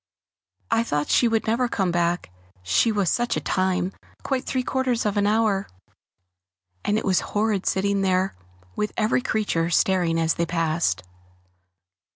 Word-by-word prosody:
I 225 0 +3
thought 150 -10 -2
she 240 - +4
would 225 -1 0
never 235 +3 +1
come 190 -6 0
back, 170 - 0 0.3
she 95 - +2
was 205 -3 0
such 240 +7 +1
a - - +1
time, 185 -1 0 0.3
quite 265 -2 -1
three 255 -1 -1
quarters 255 -3 0
of 210 -1 0
an 205 0 +2
hour; 210 -2 +1 1.2
and 210 - +1
it - - -2
was 190 -2 +3
horrid 210 -2 -1
sitting 200 +1 +1
there 185 0 +1
alone, 90 0 -30
with 210 - -2
every 220 +3 +2
creature 200 -8 0
staring 175 -2 +2
as 165 0 +2
they 170 - -1
passed. 160 - 0
195 Hz, 160 wpm, -24 LUFS, 170-220 Hz, 1.2 s, she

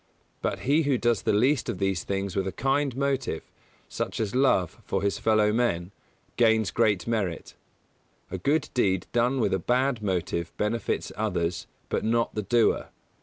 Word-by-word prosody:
But - - -2
he 145 +5 +3
who 140 -4 +1
does 120 -3 +1
the - - +1
least 125 +6 +2
of 115 - -2
these 95 -2 0
things 100 -1 -3
with 95 -1 0
a - - -2
kind 135 +2 0
motive, 135 - -1 0.4
such - - -4
as 110 -3 -1
love 125 -10 +2
for - - -2
his 100 - 0
fellow 110 -1 +3
men, 95 -7 0 0.5
gains 110 -3 +3
great 105 -6 +2
merit. 100 -8 -2 0.8
A 95 - -4
good 145 - +1
deed 95 -7 +1
done 125 +3 +2
with 115 - +1
a 95 - +1
bad 125 +4 +1
motive 85 -4 -2
benefits 110 +2 -1
others, 90 -5 -2 0.2
but - - -1
not 115 +1 +1
the 105 - -2
doer. 115 +3 +2
110 Hz, 170 wpm, -27 LUFS, 95-125 Hz, 0.8 s, he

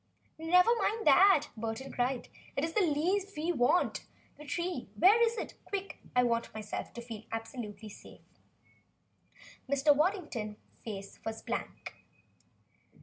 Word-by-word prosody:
"Never 360 +6 +5
mind 440 +3 0
that!" 310 +1 +6
Burton 225 +4 -4
cried. 245 0 -1 0.3
"It 275 - 0
is 325 - -5
the 425 - +3
leaves 365 +5 +1
we 320 +3 0
want! 255 +3 +1 0.3
The 300 - -10
tree 340 - -3
where 410 - +6
is 465 0 +3
it? - - -4
Quick! 395 -1 -5 0.2
I 250 - +5
want 235 -1 +1
to - - -15
feel - - -10
myself 215 -1 -5 0.4
absolutely 225 -2 -6
safe." - - -16 1.3
Mr. 280 +1 +4
Waddington's 300 - -1 0.3
face 200 -3 -7
was 225 0 -5
blank. - - -5
290 Hz, 135 wpm, -31 LUFS, 230-360 Hz, 1.3 s, that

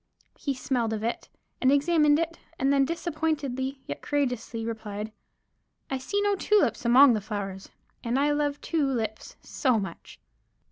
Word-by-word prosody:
He 280 -2 -2
smelled 245 -4 -1
of 215 0 -3
it, 235 - -3 0.3
and 260 - +5
examined 295 +1 +4
it, 330 +1 -2 0.2
and 270 +1 +2
then 275 -1 +4
disappointedly 290 -5 -2
yet - - -6
courageously 245 -5 -2
replied: 220 -1 -5 0.8
"I 265 - -1
see 400 +10 -1
no 410 0 +2
tulips 415 - +2
among 250 +2 +7
the 215 - -1
flowers, 195 -2 -5 0.3
and 235 +2 0
I 290 +2 +3
love 290 -1 0
two 325 -3 0
lips 220 -5 -3
so 255 -4 +1
much." 190 -4 -8
265 Hz, 150 wpm, -27 LUFS, 225-295 Hz, 0.8 s, among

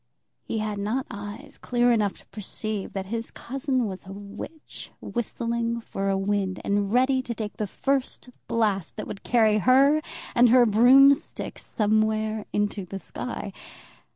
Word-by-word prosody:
He - - -4
had 215 -1 -2
not 225 +6 -1
eyes 205 +1 -8
clear 245 0 +2
enough 210 -4 +1
to - - -19
perceive 215 0 -4
that 195 -1 -3
his 230 0 -3
cousin 265 -1 -2
was 190 -3 -6
a - - -8
witch 205 +10 -9
whistling 235 0 -2
for 195 -3 -3
a 195 - +1
wind, 195 -1 -1
and 200 0 0
ready 260 +2 +3
to 235 -2 -5
take 215 -2 -5
the 210 - -2
first 270 +5 -2 0.2
blast 210 -6 0
that 210 - -5
would 200 - -7
carry 220 -3 +3
her 275 +6 +5 0.3
and 245 0 +6
her 245 +1 +7
broomstick 260 +6 +5
somewhere 215 0 0
into 205 -1 -1
the 185 +2 -6
sky. - - -6
220 Hz, 155 wpm, -26 LUFS, 205-245 Hz, 0.3 s, her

